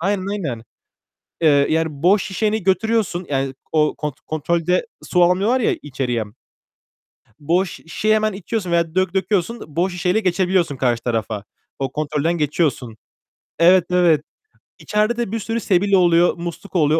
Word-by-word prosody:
Aynen, 190 +1 -1
aynen. 140 - -4 0.8
Eee, 145 -3 +4
yani, 160 +1 +1 0.2
boş 195 +3 +4
şişeni 210 +1 -1
götürüyorsun, 190 -1 0
yani, 135 -1 -1 0.2
o 150 -1 +2
kont 150 -3 -4
kontrolde 170 +3 0 0.2
su 180 -1 +2
almıyorlar 195 +8 +2
ya 235 - +1
içeriye. 130 -5 -2 1.2
Boş 175 +5 +1
şişeyi 215 +7 -1
hemen 215 -1 +1
içiyorsun 190 -1 -4
veya 170 -1 0
dök 185 -1 +1
döküyorsun, 200 +3 -1
boş 180 +2 0
şişeyle 180 +3 +1
geçebiliyorsun 185 -5 +1
karşı 120 -3 0
tarafa. 110 -3 -2 0.4
O 135 -2 -2
kontrolden 150 +3 -1
geçiyorsun. 145 -6 -1 0.6
Evet, 175 +1 +6
evet. 175 -4 +3 0.6
İçeride 215 +3 0
de 235 -4 -2
bir 230 - -2
sürü 225 +2 -2
sebil 200 0 +1
oluyor, 175 -2 +4
musluk 175 +3 -8
oluyor. 155 -1 +3
175 Hz, 140 wpm, -20 LUFS, 150-195 Hz, 1.2 s, Evet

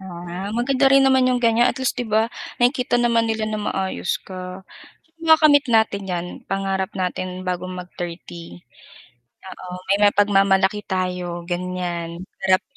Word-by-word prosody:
Oo 185 -3 -9
nga, 175 +1 -6 0.2
maganda 260 +2 +2
rin 275 0 +6
naman 260 -1 +4
yung 250 -1 +1
ganyan, 230 +1 +4
at - - -2
least, 265 0 -1
'di 245 - -2
ba, 220 +2 +2 0.3
nakikita 250 0 +2
naman 235 -1 +2
nila 220 -1 -1
na 215 0 -3
maayos 190 -3 -2
ka. 185 0 -8 0.6
Makakamit 310 -3 +5
natin 220 -3 +2
yan, 175 -1 -2 0.2
pangarap 195 -1 -1
natin 185 0 -3
bago 180 0 -2
mag-30. 170 - -8 0.9
Oo, 180 -1 -8
may 200 +1 +3
mapagmamalaki 200 0 +3
tayo 180 -2 -3
ganyan, 175 -1 -4 0.2
parap 190 -1 +3
190 Hz, 140 wpm, -22 LUFS, 180-230 Hz, 0.9 s, rin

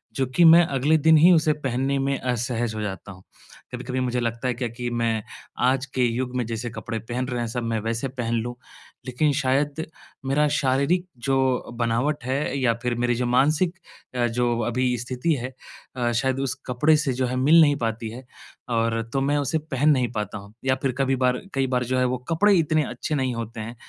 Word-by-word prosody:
जो 135 - +1
कि 175 - +5
मैं 165 +1 +8
अगले 145 +4 +2
दिन 160 +1 +5
ही 170 +4 +7
उसे 155 -2 +3
पहनने 135 +2 0
में 135 0 0
असहज 120 -2 -2
हो 110 - -3
जाता 100 -1 -5
हूँ। 95 -1 -14 0.5
कभी-कभी 125 +1 -3
मुझे 125 -1 -1
लगता 115 +1 -2
है 125 - +1
क्या 120 +1 -3
कि 120 +1 -5
मैं 115 -2 0 0.5
आज 130 +1 +1
के 130 - +2
युग 125 +2 -2
में 125 -2 0
जैसे 115 +1 -4
कपड़े 115 0 -5
पहन 125 +3 -4
रहे 125 -2 -3
हैं 120 - -2
सब 120 +2 -4
मैं 115 -1 -1
वैसे 115 +4 -2
पहन 120 -3 -3
लूँ। 120 +2 -5 0.5
लेकिन 135 +4 +1
शायद 140 +3 0 0.4
मेरा 145 +3 +2
शारीरिक 140 +7 +1 0.2
जो 135 - +3 0.4
बनावट 120 +5 0
है 135 +1 -1
या 125 -3 +2
फ़िर 125 -1 0
मेरी 120 0 0
जो 125 +1 -1
मानसिक 150 +8 +2 0.4
अ, 120 -1 +2
जो 120 0 0
अभी 125 +1 0
स्थिति 125 +6 -1
है 130 +1 -5 0.4
अ, 120 -1 0
शायद 130 +3 0
उस 135 -1 -1
कपड़े 140 +5 +3
से 150 -3 -1
जो 130 +1 -1
है 125 - -3
मिल 150 +6 +6
नहीं 145 -2 +5
पाती 115 -2 -3
है 125 +3 -9 0.5
और 115 0 +1
तो 135 - +1
मैं 145 +2 +1
उसे 145 +2 0
पहन 150 -1 0
नहीं 125 -5 +1
पाता 105 -2 -3
हूँ। 100 +1 -14
या 130 -1 +3
फ़िर 135 - +2
कभी 135 0 +2
बार 125 -1 +1
कई 135 -1 +1
बार 125 -1 0
जो 130 +2 -1
है 125 - +3
वो 125 0 0
कपड़े 200 +5 +4
इतने 155 -1 +2
अच्छे 125 +5 -3
नहीं 130 -3 0
होते 115 0 -6
हैं 115 +3 -7
125 Hz, 215 wpm, -24 LUFS, 120-140 Hz, 0.5 s, मैं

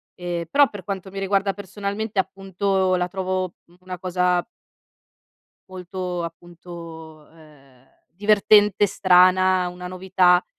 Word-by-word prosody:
ehm, 175 -1 -4
però 285 0 +5
per 205 -3 -9
quanto 195 0 -5
mi 195 - -6
riguarda 195 0 0
personalmente, 205 +2 -4
appunto, 190 0 0
la 180 0 0
trovo 185 -1 -3 0.3
una 185 0 -7
cosa 180 0 0 1.3
molto 180 -1 -5
appunto, 165 -2 -11
ehm, 140 -5 -21 0.3
divertente, 205 +1 +4
strana, 185 -1 +4
una 180 0 -9
novità, 180 -1 +2
185 Hz, 110 wpm, -22 LUFS, 175-195 Hz, 1.3 s, però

